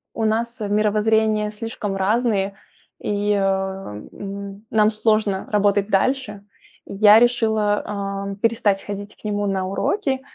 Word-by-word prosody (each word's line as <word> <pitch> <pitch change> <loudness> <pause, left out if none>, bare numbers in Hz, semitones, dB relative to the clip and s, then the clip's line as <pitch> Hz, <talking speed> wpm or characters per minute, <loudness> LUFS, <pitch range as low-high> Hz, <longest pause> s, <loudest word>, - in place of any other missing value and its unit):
у 225 - -2
нас 230 +2 -1
мировоззрения 215 +1 +1
слишком 210 -2 -5
разные 200 0 +1 0.4
и, 205 0 -1
э, - - +2 0.7
н 200 +1 -8
нам 215 -1 +4
сложно 215 -2 0
работать 205 -1 +2
дальше. 210 -1 0 0.4
Я 210 +2 +6
решила, 220 -3 +2
а, 200 -1 -4
перестать 225 -4 +1
ходить 205 0 -7
к - - -29
нему 205 -1 -1
на 190 -2 -1
уроки. 265 - -1
210 Hz, 120 wpm, -21 LUFS, 200-220 Hz, 0.7 s, Я